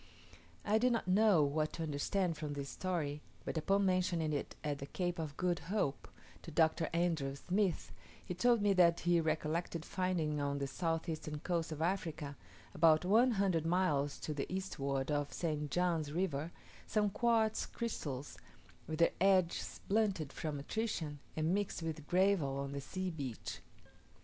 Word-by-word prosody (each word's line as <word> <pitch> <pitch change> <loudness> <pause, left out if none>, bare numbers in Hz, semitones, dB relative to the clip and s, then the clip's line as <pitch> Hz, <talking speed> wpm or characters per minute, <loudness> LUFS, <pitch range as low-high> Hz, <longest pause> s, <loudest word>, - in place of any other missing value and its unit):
I 215 +1 +3
did 250 +1 +3
not 230 - -1
know 195 -3 +5
what 155 +2 0
to 165 - -3
understand 160 +4 0
from 150 -1 -4
this 140 -1 -4
story, 150 -2 -2 0.2
but - - -3
upon 195 +5 +2
mentioning 180 -4 +1
it 145 - -3
at 145 -2 -2
the 140 - -6
Cape 175 +2 -2
of 150 -3 -4
Good 180 -1 +1
Hope 195 -9 -1 0.3
to - - -9
Dr. 160 0 +2
Andrew 165 -5 0
Smith, 185 +4 0 0.3
he - - -3
told 230 +4 +3
me 205 -1 +4
that 170 -2 +5
he 175 -1 +3
recollected 160 +1 -1
finding 165 -5 -1
on 140 0 -1
the 140 - -1
south 165 +4 -2
eastern 155 -2 -4
coast 170 -2 -1
of 155 0 -2
Africa, 165 -5 -2 0.4
about 160 0 +5
one 230 +6 +5
hundred 190 -6 +2
miles 155 -6 +1
to 155 - -3
the 145 +2 -4
eastward 140 -7 -2
of 145 -1 0
St. 150 -3 -2
John's 165 -3 0
river, 165 -2 -1 0.4
some 210 -2 +1
quartz 225 -1 +2
crystals 145 - -4 0.5
with 155 +1 -3
their 170 - +4
edges 185 -3 +2
blunted 195 -8 +1
from 155 -2 -3
attrition, 155 -2 -3 0.2
and 160 +2 +1
mixed 200 -4 -1
with 155 -2 -4
gravel 180 -7 +2
on 140 0 -3
the 140 0 -4
sea 185 +6 -3
beach. 135 - -5
165 Hz, 165 wpm, -35 LUFS, 150-185 Hz, 0.5 s, know